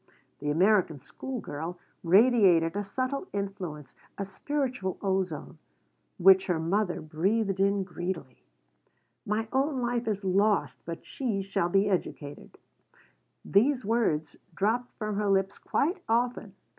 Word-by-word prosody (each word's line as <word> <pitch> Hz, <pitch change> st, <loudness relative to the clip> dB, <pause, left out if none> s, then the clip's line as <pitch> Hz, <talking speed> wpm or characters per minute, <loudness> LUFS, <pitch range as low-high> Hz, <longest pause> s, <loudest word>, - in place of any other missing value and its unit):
The 145 Hz, -, -3 dB
American 180 Hz, -1 st, +3 dB
school 255 Hz, -, -6 dB
girl 165 Hz, 0 st, -6 dB, 0.3 s
radiated 185 Hz, -3 st, +5 dB
a 205 Hz, -, -1 dB
subtle 260 Hz, -, -3 dB
influence, 185 Hz, -8 st, -5 dB, 0.2 s
a 200 Hz, -, -2 dB
spiritual 250 Hz, -2 st, -3 dB
ozone, 190 Hz, -5 st, -2 dB, 0.6 s
which 190 Hz, +1 st, +6 dB
her 175 Hz, -3 st, +1 dB
mother 180 Hz, +3 st, 0 dB
breathed 190 Hz, +6 st, 0 dB
in 200 Hz, 0 st, +2 dB
greedily 175 Hz, -7 st, -5 dB, 0.9 s
"My 215 Hz, +2 st, 0 dB
own 270 Hz, +1 st, +1 dB
life 240 Hz, -1 st, -1 dB
is 205 Hz, -2 st, -2 dB
lost, 200 Hz, +2 st, +2 dB
but 165 Hz, 0 st, -7 dB
she 220 Hz, -8 st, -2 dB
shall 190 Hz, -3 st, -1 dB
be 195 Hz, +3 st, +3 dB
educated" 155 Hz, -6 st, -4 dB, 0.9 s
these 250 Hz, +4 st, +3 dB
words 195 Hz, -10 st, 0 dB, 0.2 s
dropped 230 Hz, +6 st, 0 dB
from 215 Hz, -2 st, -3 dB
her 210 Hz, -1 st, 0 dB
lips 195 Hz, 0 st, +1 dB
quite 355 Hz, +6 st, 0 dB
often. 230 Hz, -3 st, 0 dB
195 Hz, 125 wpm, -28 LUFS, 175-230 Hz, 0.9 s, which